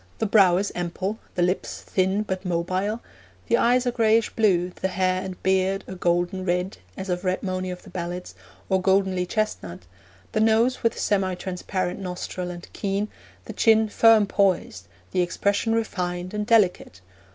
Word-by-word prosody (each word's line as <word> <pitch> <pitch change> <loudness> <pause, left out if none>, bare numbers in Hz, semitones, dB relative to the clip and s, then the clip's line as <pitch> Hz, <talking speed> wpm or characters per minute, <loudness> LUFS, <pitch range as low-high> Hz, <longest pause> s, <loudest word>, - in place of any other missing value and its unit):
The - - -1
brow 195 -4 +5
is 200 +2 -1
ample, 185 +4 -3 0.2
the 175 - +2
lips 180 +2 -1
thin 190 +2 0
but 190 -2 -4
mobile, 185 +5 -1 0.4
the 235 - +2
eyes 245 +2 +3
a 245 - +1
grayish 225 -1 +2
blue, 185 -5 +2
the 190 - -3
hair 185 0 0
and 190 -1 -7
beard 190 +1 +1
a - - -7
golden 175 +1 0
red 180 +1 -1 0.2
(as 190 - -5
of 180 0 -2
"red 185 0 -1
monie" 185 -1 -2
of 180 0 -7
the 195 - -14
ballads) 180 0 -5 0.3
or 190 -1 +1
goldenly 190 -1 +2
chestnut, 195 - -3 0.5
the - - 0
nose 225 +4 +3
with 230 - +1
semi 190 -2 +1
transparent 180 0 -3
nostril 180 -1 -5
and 175 0 -8
keen, 200 +1 -2 0.4
the - - -7
chin 220 -1 +4
firm 225 0 +5
poised, 185 - 0 0.2
the 180 - +1
expression 200 +5 0
refined 180 -5 -2
and 210 0 -2
delicate. 185 - +2
190 Hz, 165 wpm, -24 LUFS, 180-210 Hz, 0.5 s, brow